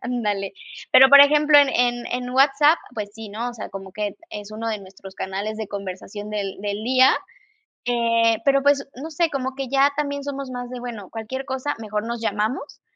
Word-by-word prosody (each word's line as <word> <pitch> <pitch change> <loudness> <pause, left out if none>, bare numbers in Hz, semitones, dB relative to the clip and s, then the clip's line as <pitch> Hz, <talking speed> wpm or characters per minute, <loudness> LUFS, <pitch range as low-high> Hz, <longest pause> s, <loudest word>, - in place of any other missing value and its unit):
Ándale. 210 -5 -2 0.4
Pero 265 +1 +9
por 280 - +10
ejemplo, 295 +1 +6
en 285 -1 +5
en 240 -1 0
en 250 0 -3
WhatsApp, 275 +4 +4 0.2
pues 210 -2 -5
sí, 225 -1 -9
¿no? 225 +4 -4
o - - -12
sea, 225 - -7
como 195 0 -8
que 210 0 -3 0.2
es 205 -4 -8
1 225 +1 -4
de 220 -2 -2
nuestros 190 0 -13
canales 200 +3 -4
de 220 0 -4
conversación 200 +1 -7
del 200 -3 -4
del 205 +1 -3
día, 260 +2 +5 0.7
eh, 230 -1 +2
pero 275 -1 +3
pues, 285 -1 +3
no 300 +6 -7
sé, 330 +2 +1
como 265 -2 -3
que 270 -1 -4
ya 275 +1 +4
también 285 -1 -2
somos 275 -1 -5
más 245 -1 -6
de: 250 - -6
"Bueno, 230 -6 -7
cualquier 230 +4 -5
cosa, 265 +2 -3
mejor 210 -1 -3
nos 235 0 -3
llamamos", 225 +5 -2
240 Hz, 200 wpm, -22 LUFS, 210-275 Hz, 0.7 s, por